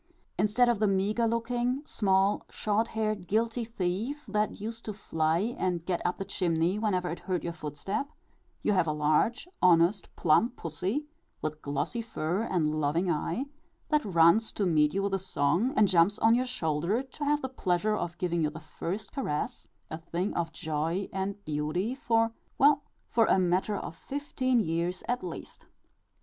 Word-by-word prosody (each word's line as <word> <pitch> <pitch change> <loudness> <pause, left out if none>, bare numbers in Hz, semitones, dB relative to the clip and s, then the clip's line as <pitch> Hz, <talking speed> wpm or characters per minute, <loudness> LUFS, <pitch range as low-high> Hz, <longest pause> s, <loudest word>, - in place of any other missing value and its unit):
Instead 215 +4 +4
of 235 -3 +2
the 215 - +3
meagre 200 +4 +1
looking, 240 +4 -1
small, 195 -3 +2
short 215 +2 0
haired, 215 -5 -2
guilty 230 +4 +1
thief, 225 +6 -3
that 210 +1 -1
used 225 +2 -4
to 215 - -4
fly 165 +3 0
and 175 -3 -1
get 180 -2 -1
up 175 - 0
the 195 - -4
chimney 175 0 0
whenever 185 -5 0
it 170 0 -4
heard 180 0 -2
your 170 - -3
footstep, 170 - -4 0.5
you 210 - +3
have 180 -4 +2
a - - +2
large, 150 - +1
honest, 180 +2 +4
plump 220 +10 +3
pussy, 185 - -2 0.3
with 155 0 -4
glossy 145 - -2
fur 185 -4 -2
and 170 -9 0
loving 165 +5 +1
eye, 170 - -1 0.4
that 300 -1 +3
runs 175 +4 +4
to 205 - -1
meet 150 -4 +3
you 195 +1 -1
with 200 0 -1
a 195 - +1
song, 185 - +1
and 210 - +6
jumps 180 +2 +4
on 225 +1 +5
your 250 +2 +2
shoulder 175 - 0
to 270 +2 -8
have 295 0 +1
the - - 0
pleasure 210 -5 0
of 175 -4 -4
giving 170 -2 0
you 150 - +2
the 155 +2 -9
first 175 +5 -5
caress 150 - -3 0.2
a 160 - -4
thing 170 +4 -2
of 165 -1 -1
joy 160 +6 -2
and 195 +1 -3
beauty 155 +9 -1
for, 230 -3 +1 0.3
well, 285 +1 +5 0.3
for 230 -2 +3
a - - +4
matter 185 +3 +1
of - - -6
fifteen 265 - -1
years 170 -1 -1
at 245 -2 -1
least. 175 -2 -8
195 Hz, 175 wpm, -29 LUFS, 170-225 Hz, 0.5 s, and